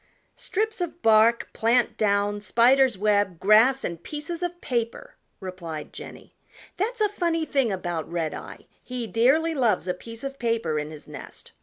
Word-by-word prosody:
"Strips 440 +1 -2
of 345 0 -5
bark, 225 +1 +4
plant 235 +1 +2
down, 205 0 +1
spider's 245 +1 +4
web, 205 -3 +1
grass, 225 +6 +5
and 170 -1 -4
pieces 305 - -6
of 350 0 -3
paper!" 240 - -3 0.3
replied 175 -5 -7
Jenny. - - -11 0.4
"That's 455 +5 -2
a 425 - +5
funny 340 -5 -1
thing 270 -7 +1
about 175 -4 -4
Redeye; 165 -3 -4 0.2
he 250 -2 -5
dearly 265 - +2
loves 230 - +1
a 180 - +1
piece 230 +6 -10
of 275 0 -6
paper 230 - 0
in 150 0 -5
his 155 -1 -11
nest. - - -10
230 Hz, 155 wpm, -25 LUFS, 195-290 Hz, 0.4 s, grass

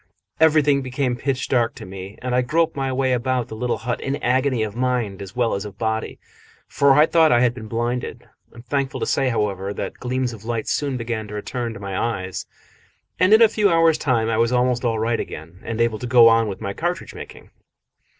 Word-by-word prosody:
Everything 150 -3 +4
became 130 -1 -2
pitch 130 +1 -2
dark 120 -3 +1
to - - -9
me, 95 +2 -9
and 125 -1 -2
I 125 - +3
groped 160 +6 +1
my 135 -1 -2
way 130 0 +1
about 125 -1 -1
the - - -7
little 120 +2 -1
hut 120 +1 -3
in 135 - -2
agony 130 -3 +1
of 105 -1 -5
mind 120 -6 -1
as 100 +3 -9
well 120 -2 +1
as 100 - -2
of 100 -2 -9
body, 110 -1 -2 0.5
for 140 -1 +3
I 150 +3 +6
thought 160 -1 +4
I 120 - +4
had 125 -1 +3
been 110 -3 -9
blinded. 120 +2 -3 0.2
I - - -22
am 120 - -10
thankful 135 +1 -2
to - - -1
say, 135 -2 +1
however, 100 -3 -2
that - - -5
gleams 125 0 -2
of 110 -2 -11
light 115 -1 -3
soon 140 -3 -1
began 115 -2 -4
to 105 - -8
return 115 +2 -4
to - - -8
my 100 -1 -5
eyes, 95 -4 -3 0.7
and 185 +2 +4
in 220 +2 +8
a - - +8
few 210 -1 +2
hours' 165 -2 +4
time 120 -5 +1
I 115 -1 0
was 115 +1 +2
almost 125 0 +1
all 115 -2 0
right 115 +1 0
again 80 +4 -8
and 115 -1 -4
able 115 -2 +1
to 125 - -5
go 120 -1 +7
on 115 0 +3
with 100 -2 -6
my 100 - -3
cartridge 175 - -3
making. - - -11
120 Hz, 230 wpm, -22 LUFS, 110-135 Hz, 0.7 s, in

